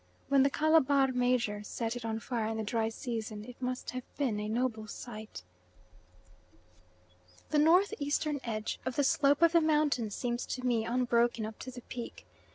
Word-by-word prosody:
When 275 Hz, -1 st, +5 dB
"the 275 Hz, -, +4 dB
Calabar 285 Hz, -3 st, +3 dB
major" 245 Hz, -4 st, +1 dB
set 225 Hz, +2 st, -3 dB
it 245 Hz, -, -6 dB
on 225 Hz, -1 st, -2 dB
fire 225 Hz, -1 st, -2 dB
in 220 Hz, 0 st, -2 dB
the 220 Hz, -, -2 dB
dry 225 Hz, +1 st, 0 dB
season 220 Hz, -2 st, -5 dB
it 250 Hz, +1 st, -12 dB
must 255 Hz, 0 st, -3 dB
have 255 Hz, -, -4 dB, 0.2 s
been 250 Hz, -7 st, 0 dB
a 210 Hz, 0 st, -3 dB
noble 225 Hz, -2 st, -1 dB
sight. 215 Hz, -, -8 dB, 2.1 s
The 300 Hz, -, +3 dB
north 355 Hz, +7 st, +5 dB
eastern 290 Hz, 0 st, 0 dB
edge 215 Hz, -2 st, -3 dB
of 260 Hz, -1 st, -3 dB
the 285 Hz, -, +2 dB
slope 285 Hz, +3 st, +3 dB
of 335 Hz, -, +7 dB
the 335 Hz, -1 st, +5 dB
mountain 300 Hz, -7 st, +2 dB
seems 240 Hz, +3 st, -3 dB
to 255 Hz, 0 st, -4 dB
me 235 Hz, -3 st, +1 dB
unbroken 240 Hz, -2 st, +1 dB
up 220 Hz, 0 st, -8 dB
to 255 Hz, -, -7 dB
the 245 Hz, -1 st, -9 dB
peak. 240 Hz, 0 st, -8 dB
245 Hz, 175 wpm, -31 LUFS, 225-280 Hz, 2.1 s, of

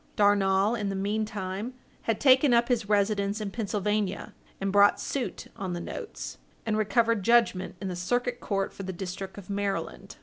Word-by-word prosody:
Darnall, 200 Hz, 0 st, +3 dB
in 210 Hz, -4 st, -1 dB
the 195 Hz, -, -2 dB
meantime, 205 Hz, +2 st, -2 dB, 0.3 s
had 225 Hz, -, +1 dB
taken 265 Hz, -1 st, +6 dB
up 235 Hz, +1 st, +3 dB
his 230 Hz, -4 st, 0 dB
residence 205 Hz, 0 st, +1 dB
in 210 Hz, -2 st, -4 dB
Pennsylvania, 210 Hz, -2 st, -1 dB, 0.3 s
and 195 Hz, 0 st, -1 dB
brought 205 Hz, +1 st, +5 dB
suit 270 Hz, -3 st, -3 dB
on 190 Hz, -5 st, -4 dB
the 175 Hz, -, -3 dB
notes, 435 Hz, -, -7 dB, 0.3 s
and 220 Hz, -2 st, 0 dB
recovered 220 Hz, +1 st, +2 dB
judgment 225 Hz, -4 st, +3 dB
in 195 Hz, -, -4 dB
the 180 Hz, -, -3 dB
Circuit 245 Hz, +7 st, -1 dB
Court 195 Hz, -1 st, -2 dB
for -, -, -8 dB
the 190 Hz, -1 st, -4 dB
district 190 Hz, +2 st, -6 dB
of 200 Hz, -, -9 dB
Maryland. 200 Hz, -1 st, -3 dB
205 Hz, 170 wpm, -28 LUFS, 195-225 Hz, 0.3 s, taken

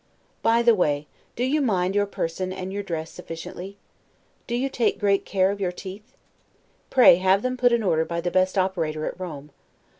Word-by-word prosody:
By 230 Hz, +1 st, +3 dB
the 235 Hz, -1 st, +6 dB
way, 150 Hz, -7 st, +1 dB, 0.3 s
do 245 Hz, -, -2 dB
you 290 Hz, +4 st, +1 dB
mind 190 Hz, -7 st, +1 dB
your 205 Hz, 0 st, +1 dB
person 185 Hz, 0 st, -3 dB
and 190 Hz, 0 st, -5 dB
your 205 Hz, -, -2 dB
dress 165 Hz, -4 st, -5 dB
sufficiently? 180 Hz, +3 st, -8 dB, 0.7 s
Do 235 Hz, -, -2 dB
you 255 Hz, +3 st, 0 dB
take 250 Hz, -3 st, 0 dB
great 200 Hz, -2 st, +2 dB
care 190 Hz, -1 st, +2 dB
of 200 Hz, 0 st, -6 dB
your 180 Hz, -2 st, 0 dB
teeth? 200 Hz, +6 st, -10 dB, 0.7 s
Pray 250 Hz, -9 st, +7 dB
have 190 Hz, +2 st, +2 dB
them 255 Hz, 0 st, -1 dB
put 245 Hz, -1 st, +3 dB
in 235 Hz, -1 st, +2 dB
order 160 Hz, -5 st, +2 dB
by 170 Hz, +1 st, -3 dB
the 175 Hz, +1 st, -2 dB
best 185 Hz, +1 st, +1 dB
operator 165 Hz, -5 st, -1 dB
at -, -, -5 dB
Rome. 150 Hz, -5 st, -7 dB
190 Hz, 190 wpm, -24 LUFS, 175-220 Hz, 0.7 s, Pray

